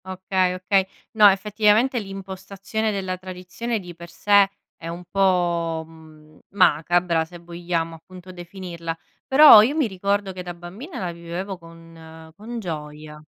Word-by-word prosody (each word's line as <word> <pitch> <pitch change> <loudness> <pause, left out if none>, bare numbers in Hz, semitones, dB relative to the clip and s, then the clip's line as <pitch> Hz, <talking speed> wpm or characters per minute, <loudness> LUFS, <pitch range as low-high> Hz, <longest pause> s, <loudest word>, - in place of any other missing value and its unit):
Okay, 185 -1 -1
okay. 190 +1 +1 0.3
No, 215 -2 +7
effettivamente, 210 +5 +2
l'impostazione 195 +2 -5
della 190 -2 -3
tradizione 185 +5 -5
di 180 -2 -10
per 170 0 -11
sé 200 +1 +3 0.3
è 165 - -10
un 170 +1 -6
po', 175 -4 +1
mhmm, 155 -1 -18 0.2
macabra, 175 -1 +2
se 175 +2 -12
vogliamo, 170 -1 -4
appunto, 185 +3 -13
definirla. 175 -2 -7 0.3
Però, 270 -5 +9
io 255 +7 +1
mi 310 -3 +2
ricordo 200 0 -1
che, 185 - -7
da 175 -1 -7
bambina, 190 - -10
la 180 -2 -3
vivevo 170 +3 -6
con 165 -1 -14
con 230 +4 -7
gioia. 150 -4 -7
180 Hz, 140 wpm, -23 LUFS, 170-195 Hz, 0.3 s, Però